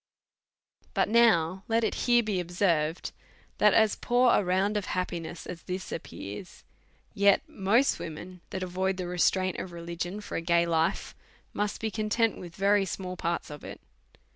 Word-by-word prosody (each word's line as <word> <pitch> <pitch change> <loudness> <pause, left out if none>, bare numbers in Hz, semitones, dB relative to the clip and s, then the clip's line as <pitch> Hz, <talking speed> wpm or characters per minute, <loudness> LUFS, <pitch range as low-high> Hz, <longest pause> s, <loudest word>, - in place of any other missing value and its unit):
But - - +2
now 190 -6 +4
let 230 0 +2
it - - +1 0.2
here 240 0 +5
be 210 -4 -1
observed, 170 -3 0 0.5
that 210 -1 +5
as 220 -2 +4
poor 245 0 +3
a - - +3
round 190 +3 +1
of 205 -2 -1
happiness 175 -2 -4
as 180 -2 -7
this 185 +1 -5
appears, 105 - -8 0.5
yet 200 -1 +3
most 220 +8 +2
Avomen 175 +3 -8
that 190 - -4
avoid 185 +1 -1
the 185 - -3
restraints 180 +1 +1
of 185 - -7
religion 170 +3 -5
for 210 - -5
a - - -2
gay 170 0 +3
life 165 +2 0 0.4
must 205 0 -2
be 220 -1 -2
content 215 +1 0
with 175 -1 -10
very 200 +1 +3
small 185 0 -5
parts 170 -3 -3
of 150 - -9
it. - - -8
185 Hz, 165 wpm, -28 LUFS, 170-210 Hz, 0.5 s, here